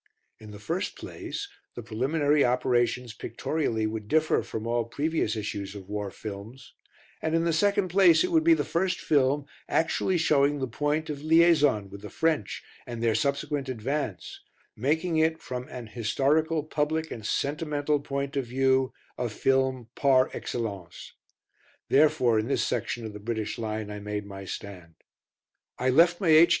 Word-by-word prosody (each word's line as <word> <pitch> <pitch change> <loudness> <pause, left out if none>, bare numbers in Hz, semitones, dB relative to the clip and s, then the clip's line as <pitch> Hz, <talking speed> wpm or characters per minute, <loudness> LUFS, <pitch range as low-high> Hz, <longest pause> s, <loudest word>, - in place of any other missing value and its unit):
In 110 - -12
the 105 - -9
first 165 - -3
place 400 - -6 0.3
the 120 - -6
preliminary 145 +6 +1
operations 125 -1 +1
pictorially 115 -8 -2
would 110 -1 -4
differ 155 +5 +2
from 110 0 -6
all 120 0 0
previous 145 -1 -1
issues 100 -2 -4
of 95 -2 -9
war 105 -1 -3
films, 110 +6 -9 0.5
and 160 0 0
in 165 - +2
the 170 -1 +1
second 200 +3 +2
place 180 - +5
it 365 - -1
would 320 -2 +4
be 335 0 +6
the - - -1
first 185 +2 0
film 140 -1 +2 0.2
actually 165 +3 +1
showing 145 -3 +3
the 135 - -1
point 150 +5 -1
of 140 -1 -6
"liaison" 155 - +4
with 100 0 -9
the 105 - -8
French 160 -11 -1 0.2
and 120 -1 -5
their 115 -1 +3
subsequent 140 0 -1
advance 130 -3 -3 0.3
making 160 +8 0
it, 160 0 +2
from 125 0 -6
an 125 -2 -7
historical, 140 +8 +1
public, 155 +1 -1
and 110 - -6
sentimental 150 0 0
point 140 0 -4
of 135 -3 -1
view, 130 +1 +2 0.3
a 120 - -1
film 130 +1 +1
par 130 -2 +3
excellence. 100 -8 -5 0.8
Therefore 140 -6 +4
in 110 - -2
this 140 - +1
section 120 -1 -2
of 110 - -6
the 105 - -8
British 110 0 -3
line 110 -1 -3
I 105 - -6
made 105 0 -4
my 100 -1 -8
stand. 90 -4 -8 0.8
I 130 - +1
left 170 +5 +5
my 190 -5 +1
H. 160 +2 +8
135 Hz, 160 wpm, -27 LUFS, 110-155 Hz, 0.8 s, H